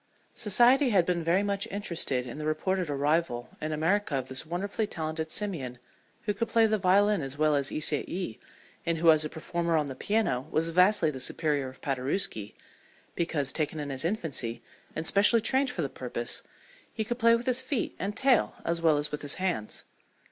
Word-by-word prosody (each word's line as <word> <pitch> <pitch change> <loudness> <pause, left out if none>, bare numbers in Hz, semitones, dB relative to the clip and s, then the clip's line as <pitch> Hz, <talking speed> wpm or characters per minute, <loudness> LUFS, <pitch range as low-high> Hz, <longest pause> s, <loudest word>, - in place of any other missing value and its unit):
Society 245 +6 +4
had 190 -6 +3
been 175 -1 -1
very 175 +5 +2
much 200 -1 -1
interested 170 -10 -1
in 125 +4 -7
the 150 - -4
reported 180 +3 -1
arrival 145 -3 0
in 155 - -3
America 165 +2 0
of 130 -1 -3
this 130 +4 0
wonderfully 200 +5 -2
talented 160 -2 -4
simian 160 - -2 0.5
who 210 - -1
could 230 +3 -2
play 225 0 +4
the 215 -1 +1
violin 200 +1 +3
as 135 0 -5
well 155 0 +3
as 140 -1 +1
Ysaye, 155 - -1 0.4
and 170 -1 -1
who 165 0 +6
as 155 -1 +3
a 155 - -3
performer 170 +1 -1
on 150 - +1
the 135 - -5
piano 180 - 0
was 165 +2 0
vastly 180 -1 +4
the 130 - -7
superior 145 0 0
of 130 - -16
Paderewski, 135 - -2 0.6
because, 150 -5 -1
taken 155 0 -2
in 145 -1 -4
his 135 +1 -2
infancy 160 - -2 0.3
and 160 - -3
specially 205 +6 +5
trained 265 +4 +1
for 185 -10 -3
the - - 0
purpose, 120 -2 -2 0.5
he 220 - -3
could 240 +3 -4
play 230 0 +5
with 235 +1 -3
his 255 0 +3
feet 260 -1 -2
and 200 +2 -3
tail 265 -3 +3
as 170 0 0
well 160 -3 +4
as 145 +1 -1
with 150 - -4
his 145 -1 +1
hands. 180 - -2
165 Hz, 190 wpm, -28 LUFS, 145-205 Hz, 0.6 s, who